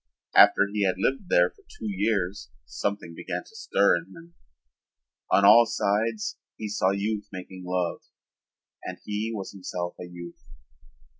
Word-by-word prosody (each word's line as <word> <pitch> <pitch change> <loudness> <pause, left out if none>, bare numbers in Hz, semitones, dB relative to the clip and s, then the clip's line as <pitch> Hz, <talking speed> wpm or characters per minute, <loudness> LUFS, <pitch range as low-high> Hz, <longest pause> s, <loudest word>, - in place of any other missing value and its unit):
After 100 - +7
he 105 -1 +1
had 95 -1 +2
lived 135 - -1
there 90 0 +4
for - - -25
two - - -12
years 100 -5 -1 0.2
something 85 +8 -3
began - - -5
to 445 - -19
stir 100 - +3
in 85 - -7
him. 170 +1 -14 1.0
On 100 - +4
all 115 +3 +8
sides 110 0 -1 0.2
he 110 - -5
saw 100 -2 +1
youth 105 +1 -2
making 95 0 -9
love 90 -1 -1 0.8
and - - -6
he 105 +2 -2
was 100 -4 -5
himself 90 -2 -5
a 90 - -6
youth. 85 -1 -10
100 Hz, 150 wpm, -26 LUFS, 90-110 Hz, 1.0 s, all